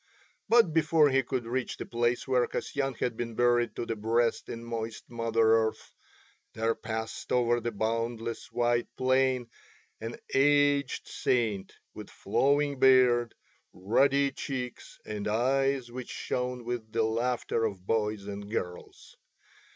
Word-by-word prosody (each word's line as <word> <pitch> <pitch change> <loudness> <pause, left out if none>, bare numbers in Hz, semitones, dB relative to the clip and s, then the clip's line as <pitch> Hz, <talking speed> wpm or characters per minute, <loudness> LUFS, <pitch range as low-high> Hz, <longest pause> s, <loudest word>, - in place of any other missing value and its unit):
But 230 -8 +5
before 155 -2 +4
he 135 0 +4
could 125 -1 -3
reach 125 +2 -3
the - - -5
place 120 +2 0
where 125 -2 +2
Kasyan 135 -2 -3
had 115 0 -2
been 115 -1 -5
buried 120 -2 +2
to - - -3
the 115 - -3
breast 115 +2 0
in 115 0 -6
moist 115 -1 -5
Mother 115 -1 +2
Earth 110 - -9 0.6
there 115 +1 +1
passed 110 0 -5
over 120 -1 +3
the 120 - -2
boundless 115 +2 -3
white 120 0 +1
plain 130 -2 +1 0.5
an 115 +1 -5 0.2
aged 145 0 +3
saint 110 -6 -1 0.2
with - - -9
flowing 140 0 +1
beard, 125 -3 +5 0.4
ruddy 135 +8 +2
cheeks, 130 -2 -6
and 105 -1 -4
eyes 130 +3 +1
which 125 0 -7
shone 125 0 -3
with 120 -2 -4
the 115 0 +1
laughter 115 +1 0
of 100 -4 -3
boys 105 -2 -1
and 100 0 -7
girls. 90 -5 -6
120 Hz, 135 wpm, -29 LUFS, 115-130 Hz, 0.6 s, But